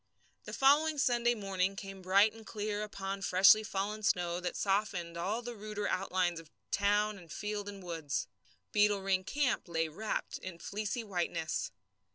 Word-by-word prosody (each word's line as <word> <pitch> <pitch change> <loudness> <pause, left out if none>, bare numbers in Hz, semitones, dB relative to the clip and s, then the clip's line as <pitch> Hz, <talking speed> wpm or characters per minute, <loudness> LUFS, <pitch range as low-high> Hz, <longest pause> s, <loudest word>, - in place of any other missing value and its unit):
The - - -7
following 295 +3 +4
Sunday 240 -3 +3
morning 195 -2 -1
came 195 -1 -8
bright 200 +4 +4
and 225 0 -12
clear 210 -1 -3
upon 195 -2 -4
freshly 195 +3 +7
fallen 210 0 -3
snow 175 -4 +1
that 180 0 -3
softened 195 -4 0
all 200 +8 -2
the 240 0 -5
ruder 210 -1 -4
outlines 180 -2 0
of 165 -2 -14 0.2
town 205 +1 +2
and 170 -3 -14
field 210 +1 -3
and 200 -2 -9
woods. 160 -5 -2 0.5
Beetle 205 -1 +3
Ring 190 -1 +1
camp 270 -1 0
lay 165 -1 0
wrapped 210 +8 -3
in 185 -2 -7
fleecy 210 +6 -3
whiteness. 175 -5 -2
200 Hz, 160 wpm, -33 LUFS, 180-215 Hz, 0.5 s, freshly